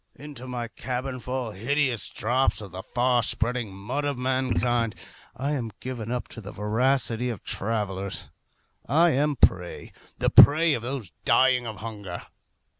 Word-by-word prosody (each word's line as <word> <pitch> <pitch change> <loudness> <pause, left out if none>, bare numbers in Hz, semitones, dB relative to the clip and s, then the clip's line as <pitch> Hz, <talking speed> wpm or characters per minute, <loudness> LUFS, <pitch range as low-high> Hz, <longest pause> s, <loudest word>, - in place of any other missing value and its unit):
Into 140 -3 -9
my 120 -2 -3
cabin 125 +3 -4
fall 125 -1 -3
hideous 125 +3 0
drops 125 +4 +1
of 100 -4 -8
the 95 +2 -6
far 125 +3 +2
spreading 115 -1 0
mud 110 +10 -4
of 145 -2 -1
mankind. 125 -3 0 0.4
I 140 +3 -2
am 120 -6 -2
given 120 -4 -5
up 125 -1 -2
to 115 - -8
the 105 0 -8
voracity 120 +3 0
of 115 -5 -5
travellers. 100 -2 -3 0.6
I 165 +5 +5
am 150 +2 +2
a - - +10
prey 90 -1 -5 0.3
the - - +1
prey 155 +2 +8
of 120 - -1
those 120 -6 -5
dying 130 -2 +4
of 110 -2 -7
hunger. 105 -6 -6
125 Hz, 155 wpm, -26 LUFS, 110-130 Hz, 0.6 s, a